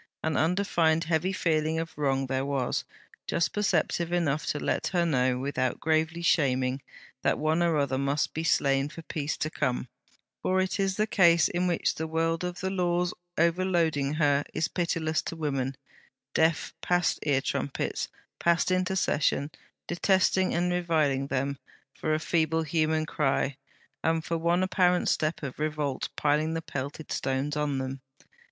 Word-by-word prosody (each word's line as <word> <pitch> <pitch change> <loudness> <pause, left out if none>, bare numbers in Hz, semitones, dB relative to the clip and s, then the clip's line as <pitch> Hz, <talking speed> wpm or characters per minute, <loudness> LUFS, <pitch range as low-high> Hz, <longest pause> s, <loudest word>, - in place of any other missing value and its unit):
An 160 -2 0
undefined 165 -1 +2
heavy 165 +3 0
feeling 160 -3 0
of 165 0 -4
wrong 135 -2 0
there 130 0 -1
was, 135 -3 -1 0.4
just 170 - 0
perceptive 195 -4 0
enough 155 -5 0
to - - 0
let - - -1
her 175 -2 +1
know, 130 -5 +2
without 130 -1 -1
gravely 160 +2 0
shaming, 130 -5 +2 0.4
that - - +2
one 155 +2 +1
or 170 -2 +2
another 140 -3 +1
must 140 +2 0
be 160 - -3
slain 140 -3 +2
for 165 +1 -10
peace 150 -2 -3
to 155 - -2
come; 125 -5 -1 0.5
for 185 0 +1
it 185 +2 -1
is 195 -1 +1
the 215 - +2
case 175 -7 +5
in 180 +1 0
which 175 -2 +1
the 160 - -4
world 165 +1 0
of 180 0 -4
the 190 0 -1
Laws 180 -1 0 0.2
overloading 165 -4 +1
her 145 -2 +3
is 155 - +1
pitiless 165 -3 -1
to - - -6
women, 135 -4 -2 0.6
deaf 160 0 +2
past 175 -1 +1
ear 140 -3 +2
trumpets, 135 +1 -2 0.3
past 170 +1 +2
intercession; 185 -6 +1 0.3
detesting 190 +1 +2
and 175 +1 +1
reviling 155 -6 +1
them 140 +1 -2 0.3
for 155 -1 -1
a - - -1
feeble 160 0 +1
human 155 0 +1
cry, 140 -3 0 0.5
and 160 0 +1
for 165 -1 -1
one 170 +2 +2
apparent 180 -1 +2
step 155 0 0
of 135 -1 -5
revolt 150 -3 -2
piling 150 +2 +1
the 165 - -2
pelted 140 +2 -6
stones 135 +3 -1
on 150 -2 0
them. 130 0 -4
160 Hz, 160 wpm, -28 LUFS, 140-170 Hz, 0.6 s, case